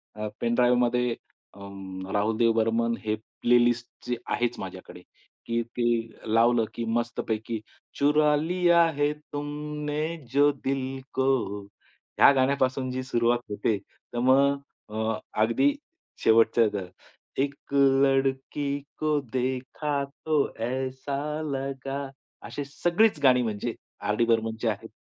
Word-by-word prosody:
अ, 105 Hz, 0 st, -3 dB
पेनड्राइवमध्ये 125 Hz, +1 st, +3 dB, 0.4 s
अं, 95 Hz, -1 st, -8 dB
राहुल 105 Hz, +2 st, +1 dB
देव 115 Hz, 0 st, +4 dB
बर्मन 115 Hz, +1 st, +1 dB
हे 110 Hz, 0 st, +1 dB, 0.3 s
प्लेलिस्ट 120 Hz, 0 st, +3 dB, 0.2 s
जी 125 Hz, -, -1 dB, 0.2 s
आहेच 120 Hz, 0 st, 0 dB
माझ्याकडे 95 Hz, -1 st, -8 dB, 0.4 s
की 115 Hz, 0 st, 0 dB
ते 120 Hz, +1 st, -2 dB, 0.5 s
लावलं, 115 Hz, 0 st, +4 dB
की 115 Hz, -, -3 dB
मस्तपैकी 115 Hz, -1 st, -3 dB, 0.4 s
चुरा 150 Hz, +1 st, +4 dB
लिया 170 Hz, +2 st, +3 dB, 0.2 s
है 145 Hz, 0 st, +3 dB, 0.2 s
तुमने 150 Hz, +1 st, -3 dB, 0.3 s
जो 145 Hz, +2 st, +5 dB
दिल 135 Hz, -1 st, -3 dB
को 130 Hz, 0 st, +1 dB, 0.9 s
ह्या -, -, +9 dB
गाण्यापासून 130 Hz, -1 st, +1 dB
जी 130 Hz, 0 st, -3 dB
सुरुवात 120 Hz, -1 st, +2 dB
होते, 105 Hz, +1 st, 0 dB
तर 120 Hz, -, -10 dB
मग 135 Hz, +3 st, +4 dB, 0.3 s
अ, 110 Hz, +1 st, -2 dB, 0.2 s
अगदी 115 Hz, -, +3 dB, 0.5 s
शेवटचं 115 Hz, 0 st, +5 dB
द 95 Hz, -3 st, -3 dB, 0.5 s
एक 140 Hz, 0 st, 0 dB, 0.5 s
लडकी 135 Hz, +1 st, +1 dB, 0.3 s
को 155 Hz, -1 st, +2 dB
देखा 130 Hz, +3 st, -1 dB, 0.2 s
तो 155 Hz, -1 st, +1 dB, 0.3 s
ऐसा 130 Hz, +2 st, -3 dB, 0.4 s
लगा 135 Hz, 0 st, -3 dB, 0.5 s
अशी 145 Hz, -, -4 dB
सगळीच 175 Hz, +7 st, +2 dB
गाणी 125 Hz, -2 st, +6 dB
म्हणजे 110 Hz, +1 st, -2 dB, 0.3 s
आर. 105 Hz, +1 st, 0 dB
डी. 115 Hz, -, +2 dB
बर्मनची 115 Hz, 0 st, 0 dB
आहेत. 110 Hz, +1 st, -2 dB
125 Hz, 115 wpm, -27 LUFS, 115-140 Hz, 0.9 s, ह्या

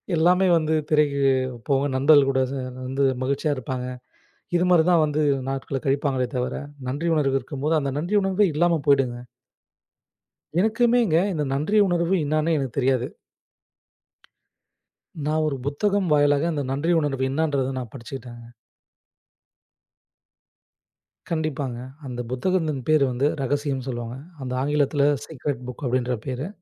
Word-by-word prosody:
எல்லாமே 180 Hz, +4 st, +4 dB
வந்து 155 Hz, -1 st, 0 dB, 0.2 s
திரைக்குப் 135 Hz, -4 st, +2 dB
போக 135 Hz, -1 st, +3 dB
நண்பர்கள் 140 Hz, 0 st, +5 dB
கூட 130 Hz, -1 st, +1 dB
சேன் 130 Hz, -2 st, -5 dB
வந்து 135 Hz, +2 st, -1 dB, 0.2 s
மகிழ்ச்சியா 140 Hz, +3 st, 0 dB
இருப்பாங்க. 130 Hz, 0 st, -4 dB, 0.7 s
இது 175 Hz, -, +2 dB
மாரிதான் 175 Hz, -1 st, +5 dB
வந்து 150 Hz, 0 st, -1 dB, 0.3 s
நாட்களக் 135 Hz, +2 st, -4 dB
கழிப்பாங்களே 135 Hz, -2 st, +1 dB
தவர, 125 Hz, 0 st, -2 dB, 0.3 s
நன்றி 145 Hz, +6 st, -2 dB
உணர்வு 135 Hz, -3 st, +2 dB
இருக்கும்போது. 145 Hz, +4 st, -2 dB
அந்த 140 Hz, -2 st, -2 dB
நன்றி 175 Hz, +7 st, 0 dB
உணர்வே 195 Hz, +1 st, +2 dB
இல்லாம 170 Hz, +1 st, +2 dB
போயிடுங்க. 135 Hz, -4 st, +3 dB, 1.4 s
எனக்குமேங்க 230 Hz, -4 st, +3 dB, 0.2 s
இந்த 155 Hz, -3 st, -1 dB
நன்றி 155 Hz, +10 st, 0 dB
உணர்வு 175 Hz, 0 st, +1 dB
இன்னான்னே 155 Hz, +2 st, +1 dB
எனக்குத் 135 Hz, -3 st, -4 dB
தெரியாது. 130 Hz, -1 st, +1 dB, 2.2 s
நான் 155 Hz, +1 st, +1 dB
ஒரு 140 Hz, -3 st, -2 dB
புத்தகம் 190 Hz, +5 st, 0 dB
வாயிலாக 145 Hz, +2 st, +3 dB
அந்த 145 Hz, -2 st, -2 dB
நன்றி 145 Hz, +6 st, 0 dB
உணர்வு 135 Hz, -3 st, -1 dB
இன்னான்றதை 140 Hz, -2 st, 0 dB
நான் 120 Hz, -3 st, -7 dB
படிச்சுக்கிட்டேங்க. 120 Hz, -2 st, -9 dB, 2.8 s
கண்டிப்பாங்க. 155 Hz, -6 st, -2 dB, 0.3 s
அந்தப் 120 Hz, -1 st, -5 dB
புத்தகத்தின் 155 Hz, 0 st, -1 dB
பெயர் 155 Hz, -3 st, +5 dB
வந்து 130 Hz, +4 st, +1 dB
"ரகசியம்"ன்னு 135 Hz, -1 st, -2 dB
சொல்லுவாங்க. 120 Hz, 0 st, -5 dB, 0.3 s
அந்த 125 Hz, -1 st, -4 dB
ஆங்கிலத்துல 145 Hz, 0 st, +1 dB, 0.2 s
"ஸீக்ரட் 140 Hz, -4 st, -4 dB
புக்" 125 Hz, -, -9 dB
அப்டின்ற 125 Hz, 0 st, 0 dB
பேரு. 130 Hz, +5 st, -3 dB
140 Hz, 120 wpm, -24 LUFS, 130-160 Hz, 2.8 s, நண்பர்கள்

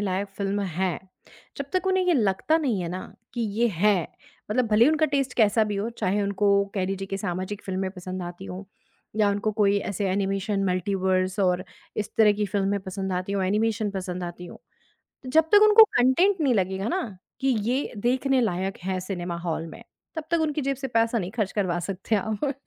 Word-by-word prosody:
लायक 195 Hz, 0 st, -1 dB
film 200 Hz, 0 st, -1 dB
है। 185 Hz, -2 st, -1 dB, 0.6 s
जब 280 Hz, -, -4 dB
तक 370 Hz, 0 st, 0 dB
उन्हें 375 Hz, -1 st, +2 dB
यह 350 Hz, -, +4 dB
लगता 215 Hz, +7 st, +2 dB
नहीं 245 Hz, -, 0 dB
है 170 Hz, -, -3 dB
ना? 185 Hz, +2 st, -7 dB, 0.2 s
कि 240 Hz, -, -2 dB
ये 225 Hz, +2 st, +1 dB
है। 200 Hz, +4 st, +3 dB, 0.5 s
मतलब 240 Hz, +2 st, +2 dB
भले 225 Hz, +5 st, +5 dB
उनका 310 Hz, 0 st, +3 dB
टेस्ट 275 Hz, -3 st, 0 dB
कैसा 220 Hz, -1 st, +4 dB
भी 205 Hz, -1 st, -3 dB
हो, 210 Hz, +3 st, -1 dB
चाहे 205 Hz, -2 st, -1 dB
उनको 200 Hz, 0 st, +2 dB
कह 190 Hz, -2 st, 0 dB
लीजिए 195 Hz, 0 st, -3 dB
कि 195 Hz, -, -3 dB
सामाजिक 190 Hz, +1 st, -4 dB
फ़िल्में 190 Hz, 0 st, -2 dB
पसंद 185 Hz, 0 st, -6 dB
आती 175 Hz, +2 st, -7 dB
हों 185 Hz, +1 st, -7 dB, 0.5 s
या 210 Hz, -2 st, +4 dB
उनको 205 Hz, +2 st, -1 dB
कोई 205 Hz, -1 st, +3 dB
ऐसे 200 Hz, -1 st, -2 dB
एनिमेशन 195 Hz, +1 st, 0 dB
मल्टीवर्स 185 Hz, +1 st, 0 dB
और 180 Hz, 0 st, +2 dB, 0.3 s
इस 210 Hz, -, -2 dB
तरह 215 Hz, -2 st, +6 dB
की 205 Hz, 0 st, -1 dB
फ़िल्में 200 Hz, +1 st, 0 dB
पसंद 190 Hz, 0 st, -4 dB
आती 185 Hz, +2 st, -2 dB
हों, 195 Hz, -2 st, 0 dB
एनिमेशन 215 Hz, +1 st, 0 dB
पसंद 185 Hz, -2 st, -4 dB
आती 175 Hz, +1 st, -7 dB
हों। -, -, -10 dB, 0.7 s
जब 320 Hz, +3 st, +3 dB
तक 415 Hz, 0 st, +7 dB
उनको 440 Hz, +1 st, +10 dB
कंटेन्ट 335 Hz, +9 st, +3 dB
नहीं 270 Hz, -4 st, +3 dB
लगेगा 190 Hz, 0 st, 0 dB
न? 235 Hz, -, -3 dB, 0.2 s
कि 270 Hz, -, -1 dB
ये 245 Hz, +3 st, 0 dB
देखने 255 Hz, +3 st, +1 dB
लायक 190 Hz, -2 st, -1 dB
है 190 Hz, -1 st, -1 dB
सिनेमा 180 Hz, -2 st, -4 dB
हॉल 165 Hz, -1 st, -3 dB
में, -, -, -11 dB, 0.3 s
तब 320 Hz, -, -3 dB
तक 335 Hz, -, +3 dB
उनकी 300 Hz, -1 st, 0 dB
जेब 275 Hz, +1 st, 0 dB
से 270 Hz, -1 st, -4 dB
पैसा 230 Hz, 0 st, +1 dB
नहीं 185 Hz, +1 st, -4 dB
खर्च 215 Hz, -4 st, -1 dB
करवा 180 Hz, -4 st, 0 dB
सकते 195 Hz, +4 st, -2 dB
आप 220 Hz, +7 st, -1 dB
200 Hz, 200 wpm, -25 LUFS, 185-235 Hz, 0.7 s, उनको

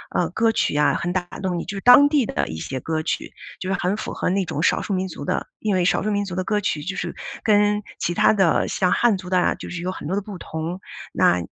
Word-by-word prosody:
呃， 175 Hz, -, +1 dB
歌 225 Hz, +5 st, +2 dB
曲 220 Hz, -, 0 dB
呀？ 150 Hz, 0 st, +3 dB
很 175 Hz, -, -2 dB
打 185 Hz, -, +1 dB, 0.2 s
动 185 Hz, -2 st, -1 dB
你， 170 Hz, -, -4 dB
就 205 Hz, -, -5 dB
是 195 Hz, -, -5 dB
当 245 Hz, +5 st, +8 dB
地 285 Hz, -6 st, +2 dB
的 -, -, -1 dB
一 80 Hz, -, -6 dB
些 130 Hz, +11 st, -4 dB
歌 160 Hz, +4 st, -2 dB
曲， -, -, -3 dB, 0.3 s
就 185 Hz, -, -5 dB
是 190 Hz, -, +1 dB
很 185 Hz, +3 st, 0 dB
符 215 Hz, -, -5 dB
合 -, -, -1 dB
那 190 Hz, +1 st, +1 dB
种 155 Hz, -, -3 dB
少 -, -, +2 dB
数 205 Hz, -, -2 dB
民 190 Hz, 0 st, -1 dB
族 150 Hz, -5 st, -8 dB
的。 -, -, -1 dB
因 215 Hz, -2 st, 0 dB
为 185 Hz, -1 st, +2 dB
少 175 Hz, -, +2 dB
数 215 Hz, -, 0 dB
民 205 Hz, 0 st, 0 dB
族 185 Hz, -3 st, -6 dB
的 185 Hz, -, -1 dB
歌 210 Hz, +2 st, 0 dB
曲 150 Hz, -6 st, -1 dB
就 190 Hz, +4 st, -4 dB
是 -, -, -4 dB, 0.3 s
跟 210 Hz, -1 st, +3 dB, 0.2 s
其 175 Hz, -, -1 dB
他 -, -, +4 dB
的 190 Hz, -5 st, +3 dB
像 180 Hz, -3 st, +1 dB
汉 230 Hz, -1 st, +3 dB
族 185 Hz, -1 st, -9 dB
的 185 Hz, -, +4 dB
啊， -, -, +2 dB
就 -, -, -9 dB
是 175 Hz, -1 st, -4 dB
有 180 Hz, +1 st, -2 dB
很 165 Hz, -, -7 dB
多 185 Hz, -, -1 dB
的 200 Hz, -, 0 dB
不 200 Hz, -1 st, -8 dB
同， 165 Hz, +2 st, -5 dB, 0.3 s
那， 90 Hz, -, +3 dB
185 Hz, 300 characters per minute, -22 LUFS, 175-205 Hz, 0.3 s, 当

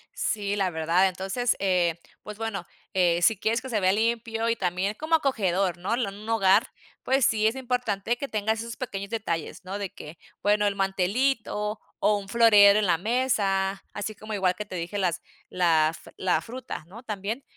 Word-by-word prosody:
Sí, 205 Hz, -2 st, -1 dB
la 195 Hz, -2 st, +1 dB
verdad. 170 Hz, +3 st, +2 dB
Entonces, 195 Hz, +6 st, -1 dB
eh, 180 Hz, -3 st, +1 dB, 0.2 s
pues 210 Hz, 0 st, -8 dB
bueno, 220 Hz, -5 st, -4 dB, 0.3 s
eh, 175 Hz, -2 st, +3 dB
si 220 Hz, +4 st, +4 dB
quieres 225 Hz, +3 st, 0 dB
que 260 Hz, -, -8 dB
se 220 Hz, -4 st, 0 dB
vea 185 Hz, -1 st, +3 dB
limpio 225 Hz, +1 st, 0 dB
y 230 Hz, -, +2 dB
también 185 Hz, +1 st, -1 dB
como 315 Hz, +6 st, +1 dB
acogedor, 195 Hz, -, +1 dB
¿no? 185 Hz, +6 st, -2 dB
L 240 Hz, -2 st, 0 dB
Un 205 Hz, +2 st, -11 dB
hogar, 205 Hz, -2 st, +4 dB, 0.4 s
pues 265 Hz, -1 st, +2 dB
sí 215 Hz, -1 st, +3 dB
es 225 Hz, -, 0 dB
importante 245 Hz, -4 st, -1 dB
que 280 Hz, -, -4 dB
tengas 220 Hz, -1 st, -1 dB
esos 230 Hz, 0 st, -7 dB
pequeños 200 Hz, -6 st, -5 dB
detalles, 200 Hz, -7 st, -3 dB
¿no? 190 Hz, +2 st, -5 dB
De 200 Hz, -2 st, -5 dB
que, 150 Hz, +3 st, -10 dB, 0.2 s
bueno, 210 Hz, 0 st, +3 dB
el 200 Hz, -, -1 dB
mantelito 210 Hz, +2 st, 0 dB, 0.2 s
o 210 Hz, 0 st, +3 dB
un 200 Hz, -1 st, -7 dB
florero 210 Hz, -2 st, +7 dB
en 215 Hz, -, +1 dB
la 170 Hz, -2 st, +3 dB
mesa, 200 Hz, -3 st, 0 dB
así 210 Hz, +1 st, -4 dB
como 215 Hz, +1 st, -8 dB
igual 190 Hz, -3 st, +1 dB
que 210 Hz, -, -5 dB
te 195 Hz, -, -8 dB
dije 175 Hz, +4 st, -4 dB
las 180 Hz, -4 st, 0 dB, 0.3 s
la 165 Hz, -4 st, +3 dB
f -, -, -13 dB
la 185 Hz, -1 st, +1 dB
fruta, 245 Hz, -6 st, -7 dB
¿no?, 220 Hz, +7 st, -12 dB
también. 215 Hz, +3 st, -4 dB
205 Hz, 190 wpm, -26 LUFS, 190-225 Hz, 0.4 s, florero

